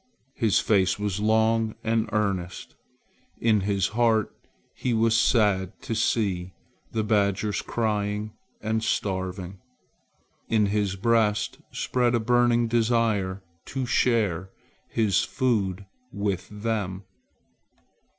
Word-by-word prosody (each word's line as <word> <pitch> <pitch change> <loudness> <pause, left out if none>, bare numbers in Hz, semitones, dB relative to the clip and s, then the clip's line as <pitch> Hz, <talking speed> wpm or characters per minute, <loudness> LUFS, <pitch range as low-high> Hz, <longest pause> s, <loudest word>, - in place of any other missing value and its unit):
His 115 -7 +2
face 95 -3 +2
was 105 -2 -2
long 110 +1 +2
and 115 -1 0
earnest. 100 -5 -2 0.7
In 110 -3 +3
his 100 -1 0
heart 115 -1 +2 0.4
he 125 -2 -1
was 115 0 +3
sad 105 -5 +2
to - - -3
see 100 -5 0 0.4
the 110 -1 -1
badgers 105 -1 +1
crying 105 -1 -2 0.3
and 110 +1 -1
starving. 95 -2 -2 0.9
In 110 -2 +3
his 100 -1 0
breast 110 0 +1
spread 125 -1 +1
a - - +2
burning 120 0 +3
desire 110 -5 +1 0.2
to 130 -1 -3
share 105 -8 +1 0.4
his 105 -5 +2
food 105 -7 -1 0.3
with 100 -4 -2
them. 105 -3 -3
105 Hz, 105 wpm, -26 LUFS, 100-115 Hz, 0.9 s, In